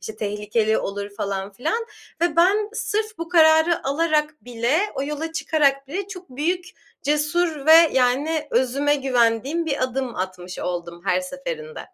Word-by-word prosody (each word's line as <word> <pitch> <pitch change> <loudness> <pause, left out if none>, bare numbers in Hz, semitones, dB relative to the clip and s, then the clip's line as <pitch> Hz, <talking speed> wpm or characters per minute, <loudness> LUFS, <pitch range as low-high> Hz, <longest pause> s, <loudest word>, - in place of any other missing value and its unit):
işte, 220 - -8
tehlikeli 210 +1 0
olur 200 +1 -4
falan 195 0 -3
filan 450 - -2 0.3
ve 340 -2 +1
ben 400 +5 +4
sırf 435 -1 -2
bu 335 0 -5
kararı 320 0 +4
alarak 300 +1 0
bile, 245 +5 0 0.2
o 270 - -2
yola 300 +3 -4
çıkarak 280 -4 +1
bile 380 +6 -4
çok 365 -5 -10
büyük, 335 +8 -1 0.4
cesur 300 +1 0
ve 325 +1 +8
yani 285 +5 +1
özüme 265 +4 +2
güvendiğim 265 +3 +1
bir 280 -4 -1
adım 255 -1 -3
atmış 185 -1 -5
oldum 175 -1 -5
her 185 -1 +2
seferinde. 465 - -6
285 Hz, 145 wpm, -22 LUFS, 230-330 Hz, 0.4 s, ve